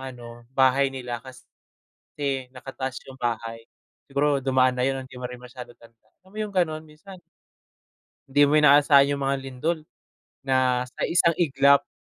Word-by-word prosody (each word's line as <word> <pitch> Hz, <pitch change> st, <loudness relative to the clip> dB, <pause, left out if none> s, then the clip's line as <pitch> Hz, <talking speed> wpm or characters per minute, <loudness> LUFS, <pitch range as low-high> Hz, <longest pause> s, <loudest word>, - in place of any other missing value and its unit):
ano 120 Hz, -2 st, -10 dB
bahay 135 Hz, +1 st, +4 dB
nila 125 Hz, -3 st, -6 dB, 0.8 s
kasi 135 Hz, -3 st, -5 dB
nakataas 130 Hz, 0 st, -6 dB
yung 130 Hz, -1 st, -13 dB
bahay. 115 Hz, -1 st, -3 dB, 0.5 s
Siguro 140 Hz, 0 st, +1 dB
dumaan 130 Hz, -1 st, +2 dB
na -, -, +2 dB
'yon 135 Hz, 0 st, -1 dB
hindi 130 Hz, -, -16 dB
mo 125 Hz, -, -4 dB
rin 125 Hz, -, -9 dB
masyadong 125 Hz, -1 st, -11 dB
tanda, 115 Hz, -1 st, -22 dB, 0.2 s
alam 190 Hz, -, -21 dB
mo 215 Hz, -, -10 dB
yung 210 Hz, -, -3 dB
gano'n? 155 Hz, -3 st, 0 dB
Minsan 165 Hz, +5 st, -14 dB, 1.1 s
di 145 Hz, +1 st, +4 dB
mo 150 Hz, -, +3 dB
inaasahan 145 Hz, -1 st, +6 dB
yung 140 Hz, -, -7 dB
mga 135 Hz, 0 st, +1 dB
lindol 135 Hz, +6 st, -2 dB, 0.7 s
na 130 Hz, -2 st, +1 dB
sa 125 Hz, -, -7 dB
1 170 Hz, -1 st, +2 dB
iglap 140 Hz, -3 st, +3 dB
135 Hz, 155 wpm, -24 LUFS, 125-145 Hz, 1.1 s, inaasahan